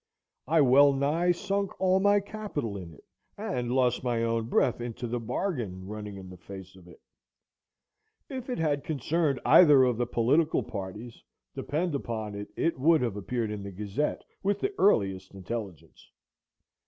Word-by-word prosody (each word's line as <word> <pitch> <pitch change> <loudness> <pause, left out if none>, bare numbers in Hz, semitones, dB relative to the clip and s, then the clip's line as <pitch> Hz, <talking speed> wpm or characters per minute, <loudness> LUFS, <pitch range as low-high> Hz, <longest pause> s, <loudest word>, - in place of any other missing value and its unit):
I 160 +2 +4
well 140 +2 +6
nigh 150 +6 +1
sunk 195 +2 -2
all 190 0 +3
my 205 +1 +4
capital 200 - -5
in 90 -4 -7
it, 75 - -18 0.3
and 120 -1 -3
lost 125 -1 +1
my 120 -2 0
own 115 -1 -1
breath 120 -1 +2
into 120 0 -5
the 120 +1 -2
bargain, 115 - -3
running 105 0 -7
in 95 -1 -10
the 90 - -11
face 95 0 -10
of 90 -2 -16
it. 90 - -15 1.3
If 260 -2 -7
it 250 - -2
had 145 -3 0
concerned 150 -1 0
either 150 -1 +7
of 125 -3 +2
the 120 0 -1
political 140 +8 +2
parties, 105 +4 -7 0.3
depend 165 +3 -2
upon 110 -6 -4
it, 100 0 -6
it 165 -5 0
would 160 +3 +4
have 115 -5 -1
appeared 110 +2 -3
in 105 -1 -5
the 100 - -6
Gazette 105 +9 -3 0.2
with 200 +1 0
the 400 +1 -1
earliest 95 - +2
intelligence. 95 -2 -7
125 Hz, 165 wpm, -28 LUFS, 105-160 Hz, 1.3 s, either